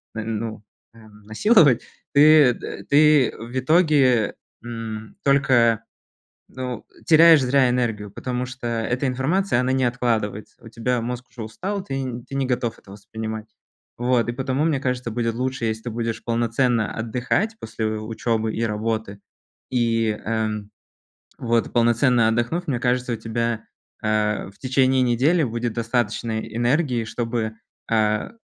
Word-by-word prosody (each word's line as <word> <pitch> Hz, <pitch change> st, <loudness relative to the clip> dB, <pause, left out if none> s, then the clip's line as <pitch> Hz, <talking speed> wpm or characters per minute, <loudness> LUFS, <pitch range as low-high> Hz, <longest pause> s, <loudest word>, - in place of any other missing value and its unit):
ну, 110 Hz, 0 st, -4 dB, 0.3 s
м, 110 Hz, -2 st, -17 dB
насиловать, 135 Hz, -, +4 dB, 0.3 s
ты 150 Hz, -2 st, +7 dB
т -, -, -8 dB
ты 150 Hz, -2 st, +5 dB
в 120 Hz, +3 st, -7 dB
итоге, 135 Hz, -, +3 dB, 0.3 s
м, 115 Hz, -2 st, -7 dB
только, 120 Hz, -5 st, +3 dB, 0.7 s
ну, 125 Hz, -3 st, -6 dB, 0.2 s
теряешь 165 Hz, -2 st, +7 dB
зря 130 Hz, 0 st, +3 dB
энергию, 115 Hz, -5 st, -1 dB
потому 125 Hz, +4 st, -3 dB
что 130 Hz, -1 st, -8 dB
эта 120 Hz, +4 st, -1 dB
информация, 135 Hz, +3 st, +1 dB
она 130 Hz, +1 st, 0 dB
не 130 Hz, -1 st, +1 dB
откладывается. 115 Hz, -4 st, -2 dB
У -, -, -10 dB
тебя 120 Hz, +2 st, -1 dB
мозг 125 Hz, +1 st, -5 dB
уже 120 Hz, -, -8 dB
устал, 185 Hz, -, -4 dB
ты 135 Hz, -, -5 dB
н 125 Hz, -2 st, -5 dB
ты 135 Hz, -, -9 dB
не 135 Hz, -1 st, 0 dB
готов 120 Hz, -2 st, -2 dB
это 95 Hz, -, -15 dB
воспринимать. 110 Hz, +1 st, -7 dB, 0.5 s
Вот 120 Hz, -1 st, +1 dB
и 120 Hz, -, 0 dB
потому 135 Hz, +3 st, -1 dB
мне 160 Hz, -4 st, +1 dB
кажется 125 Hz, -2 st, -2 dB
будет 115 Hz, 0 st, -1 dB
лучше, 130 Hz, 0 st, -2 dB
если 110 Hz, +1 st, -3 dB
ты 120 Hz, -, -4 dB
будешь 115 Hz, 0 st, -3 dB
полноценно 115 Hz, -1 st, 0 dB
отдыхать 125 Hz, -, -1 dB
после 110 Hz, 0 st, -4 dB
учебы 110 Hz, 0 st, -2 dB
и 115 Hz, -, -2 dB
работы, 110 Hz, -2 st, -3 dB, 0.5 s
э, -, -, -1 dB, 0.3 s
м, 105 Hz, -1 st, -3 dB, 0.7 s
вот 115 Hz, -1 st, 0 dB
полноценно 120 Hz, 0 st, +3 dB
отдохнув, 120 Hz, +10 st, -1 dB
мне 125 Hz, -4 st, -1 dB
кажется 125 Hz, 0 st, 0 dB
у -, -, -3 dB
тебя, 115 Hz, 0 st, -2 dB, 0.4 s
э, 105 Hz, -2 st, 0 dB
в 100 Hz, -, -23 dB
течение 130 Hz, 0 st, +2 dB
недели 135 Hz, +8 st, +2 dB
будет 120 Hz, -1 st, -2 dB
достаточно 115 Hz, -1 st, -1 dB
энергии, 120 Hz, +2 st, 0 dB
чтобы, 115 Hz, 0 st, -3 dB, 0.4 s
э, 105 Hz, -1 st, +1 dB
120 Hz, 140 wpm, -22 LUFS, 110-130 Hz, 0.7 s, ты